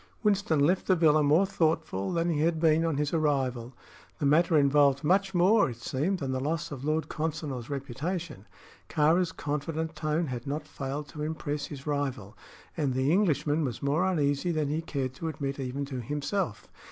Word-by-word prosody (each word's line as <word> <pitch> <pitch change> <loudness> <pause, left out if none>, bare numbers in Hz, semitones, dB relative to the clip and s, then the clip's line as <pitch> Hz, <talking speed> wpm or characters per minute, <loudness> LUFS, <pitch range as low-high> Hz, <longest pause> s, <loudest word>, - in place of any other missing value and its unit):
Winston 200 -7 +2
left 180 +6 +2
the 185 - +5
villa 155 -3 +4
more 150 +6 +4
thoughtful 160 - 0
than 170 -1 0
he 150 - 0
had 160 +1 +1
been 160 0 +4
on 165 -4 0
his 150 +1 -1
arrival. 135 -6 0 0.5
The 145 - -2
matter 160 +3 +4
involved 140 -1 +4
much 195 +4 +2
more, 185 -1 +4
it 120 - -6
seemed, 150 +10 -1
than 135 -5 -3
the 130 - -1
loss 150 +4 -2
of 135 -3 -6
Lord 155 +2 0
Consinor's 150 -6 -4
reputation. 145 - -4 0.4
Kāra's 165 +3 +3
confident 160 +2 -3
tone 155 +2 0
had 125 -2 -5
not 150 +2 -3
failed 140 +1 -5
to 150 - -8
impress 150 -1 -3
his 140 -2 -9
rival, 135 -8 -3 0.4
and 140 -6 0
the 130 +3 +2
Englishman 160 -5 +2
was 125 -3 -4
more 145 +5 +2
uneasy 150 -3 +1
than 155 -3 0
he 155 +2 -1
cared 135 -5 -3
to 165 +5 -5
admit 140 -3 -4
even 135 +2 -3
to 130 -3 -5
himself. 150 - -3
150 Hz, 180 wpm, -28 LUFS, 140-165 Hz, 0.5 s, the